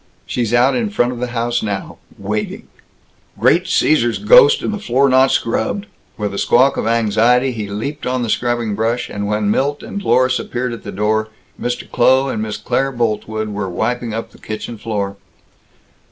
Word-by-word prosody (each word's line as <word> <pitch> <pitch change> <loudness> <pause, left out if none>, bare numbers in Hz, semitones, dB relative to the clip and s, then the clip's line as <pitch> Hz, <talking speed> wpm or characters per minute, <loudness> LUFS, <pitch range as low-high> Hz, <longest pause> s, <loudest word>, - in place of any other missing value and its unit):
"She's 120 -3 -2
out 120 +3 +4
in 230 -3 0
front 125 - +1
of 125 - -6
the 125 - -2
house 120 0 -1
now 100 -2 -4 0.2
waiting!" 105 +2 -4 0.7
"Great - - +3
Cæsar's 120 -7 +2
ghost, 470 -3 +6
and - - -1
the 210 - -4
floor 140 - +2
not 130 +1 +5
scrubbed!" 115 - -1 0.3
With 105 -2 -3
a 100 - -3
squawk 130 +3 +4
of - - -2
anxiety 115 +3 +3
he 110 -4 -5
leaped 135 +10 -4
on 125 -1 -1
the 115 - -3
scrubbing 120 -3 0
brush, 115 +4 -1
and 100 0 -3
when 105 0 0
Milt 145 +5 0
and 200 - -5
Dlorus 130 -5 +2
appeared 125 0 -3
at 115 - -8
the 100 - -7
door, 110 +2 0 0.3
Mr. 120 0 -3
Kloh 130 +2 +3
and 110 - -2
Miss 105 -1 -3
Claire 125 +5 -1
Boltwood 110 -2 -2
were 100 -2 -3
wiping 120 +6 -2
up 115 +1 -5
the - - -18
kitchen 110 +1 -6
floor. 100 -3 -3
120 Hz, 180 wpm, -18 LUFS, 110-130 Hz, 0.7 s, ghost